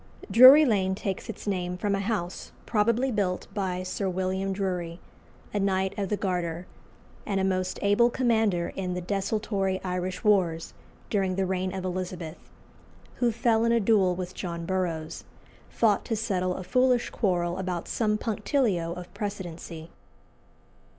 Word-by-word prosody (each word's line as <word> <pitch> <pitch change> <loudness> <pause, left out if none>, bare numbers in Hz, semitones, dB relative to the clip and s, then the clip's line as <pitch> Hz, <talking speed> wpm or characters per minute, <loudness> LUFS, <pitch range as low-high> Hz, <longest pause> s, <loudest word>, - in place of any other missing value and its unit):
Drury 260 +8 +10
Lane 190 -6 +1
takes 195 -2 -4
its - - -7
name 180 -3 -2
from 205 +2 -1
a 195 - 0
house 195 -4 -3
probably 235 +4 +1
built 195 -5 -1
by 185 -3 -2
Sir 190 +1 -2
William 190 +1 -1
Drury, 180 -3 -3 0.5
a 205 - 0
Knight 190 -1 0
of 200 -3 -2
the 210 - 0
Garter, 175 -3 -2 0.6
and 195 -2 -1
a - - 0
most 185 -1 0
able 205 +4 +4
commander 225 -8 +1
in 180 -2 -3
the 180 - -3
desultory 195 0 -1
Irish 180 0 -3
wars 180 -6 +2 0.4
during 190 -3 +1
the 190 0 0
reign 185 0 -1
of 190 0 -5
Elizabeth, 180 -3 -4 0.8
who 240 -1 +2
fell 225 0 +2
in 230 - +3
a 235 - +4
duel 195 -4 +3
with 180 0 -5
John 170 -2 -5
Burroughs, 165 -4 -2 0.5
fought 215 -3 +2
to 225 - -1
settle 185 -5 -1
a 185 - -5
foolish 250 +5 +2
quarrel 175 -4 0
about 180 -2 -3
some 210 -2 0
punctilio 210 - 0
of 180 0 -9
precedency. 175 -5 -6
190 Hz, 150 wpm, -27 LUFS, 180-210 Hz, 0.8 s, Drury